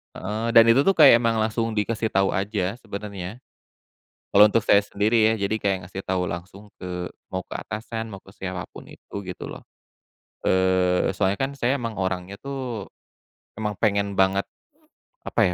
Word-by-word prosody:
Heeh. 110 +4 -3
Dan 115 -1 +8
itu 120 +4 +6
tuh 195 - +4
kayak 140 -7 +8
emang 115 -1 +2
langsung 115 +1 0
dikasih 110 +1 -1
tahu 95 0 +2
aja 100 0 -1
sebenarnya. 100 0 -6 1.0
Kalau 105 +1 +8
untuk 115 - +4
saya 100 - +6
sendiri 110 +2 +2
ya - - +2
jadi 110 - -1
kayak 100 -1 +1
ngasih 95 +1 -7
tahu 90 -1 -1
langsung 95 +5 -7
ke 90 -1 -5 0.2
mau 95 - -1
ke - - -8
atasan 110 +1 -5
mau 95 - -8
ke 95 - -18
siapapun 95 -2 -6
itu - - -14
gitu 90 -1 -7
loh. - - -9 0.8
Eee, 95 -1 +3
soalnya 95 +1 +2
kan 135 - 0
saya 125 +2 +2
emang 115 -6 -4
orangnya 95 +1 -3
tuh, 130 -6 -5 0.7
emang 105 -2 -4
pengen 100 -2 0
banget, 95 +1 +2 0.8
apa 115 - +1
100 Hz, 160 wpm, -24 LUFS, 95-115 Hz, 1.0 s, Dan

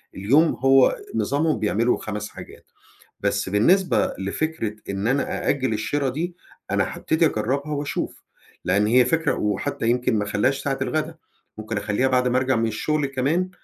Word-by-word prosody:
اليوم 140 - +3
هو 135 0 +5 0.2
نظامهم 155 +2 +1
بيعملوا 110 +3 +1
5 105 -1 -5
حاجات. - - -12 0.5
بس - - -1
بالنسبة 175 - +3
لفكرة 110 +2 -2
إن 100 +2 -2
أنا 135 +3 -1
أأجل 130 -5 +1
الشِرا 135 +6 -1
دي 170 +7 -4 0.4
أنا - - 0
هابتدي 160 +1 +1
أجرّبها 140 +4 -1
وأشوف، 145 0 -4 0.4
لأن 105 +2 +2
هي 125 +2 +5
فكرة 160 +6 +1
وحتّى 105 +2 -2
يمكن 125 0 +1
ما 105 - 0
أخلّيهاش 105 +7 0
ساعة 135 -1 -1
الغدا، 155 +4 -2 0.4
ممكن 110 0 -4
أخلّيها 105 +5 0
بعد 125 -1 +2
ما 125 +1 +2
أرجَع 130 0 +1
من 115 0 +1
الشغل 150 +7 -1
كمان 140 +7 0
130 Hz, 155 wpm, -23 LUFS, 110-145 Hz, 0.5 s, هو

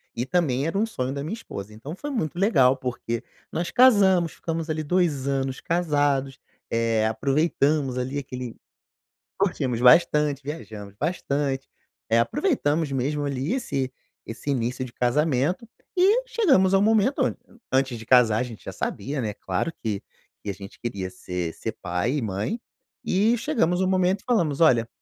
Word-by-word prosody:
e 120 - -2
também 140 -4 +1
era 165 - -2
um 220 - +3
sonho 130 - -3
da 140 0 -4
minha 180 +8 -3
esposa, 105 - -8
então 135 +10 -8
foi 290 +8 -6
muito 175 - -2
legal 135 - +4
porque, 125 -2 -4 0.3
nós 170 +1 -2
casamos, 195 -9 +5
ficamos 165 -1 -4
ali 155 0 -2
2 155 -4 0
anos 135 -1 -1
casados, 145 -6 0 0.3
eh, 115 -1 +1
aproveitamos 140 +2 +1
ali 130 +3 -3
aquele 125 -3 -6 0.8
curtimos 140 - 0
bastante, 150 +1 +5
viajamos 110 -9 -8
bastante, 140 - -2 0.4
eh, 115 +1 +4
aproveitamos 160 - 0
mesmo 145 +3 -1
ali, 140 - -1
esse 135 - -2 0.3
esse 115 +5 -5
início 125 0 -1
de 120 - -10
casamento 150 - +1 0.3
e 400 +7 +5
chegamos 275 - +3
ao 195 - +5
momento, 225 +6 +3
an - - -2 0.4
antes 130 -2 +2
de 115 - -9
casar 120 -4 +5
a - - +1
gente 115 -6 -10
já - - -6
sabia, 140 +1 -3
né, 105 -3 -3
claro 95 - -2
que 105 -4 -2 0.4
que 105 - -6
a 100 - -3
gente 100 +1 -11
queria 100 -6 -4
ser 90 -2 -4
ser - - -4
pai 90 +8 -1
e - - -2
mãe, 105 - -2 0.4
e 215 +6 +3
chegamos 190 - +1
ao 190 - +2
momento 185 +1 +2
e - - -25
falamos: 170 - +1
"Olha" 120 -8 +4
140 Hz, 165 wpm, -25 LUFS, 125-175 Hz, 0.8 s, casamos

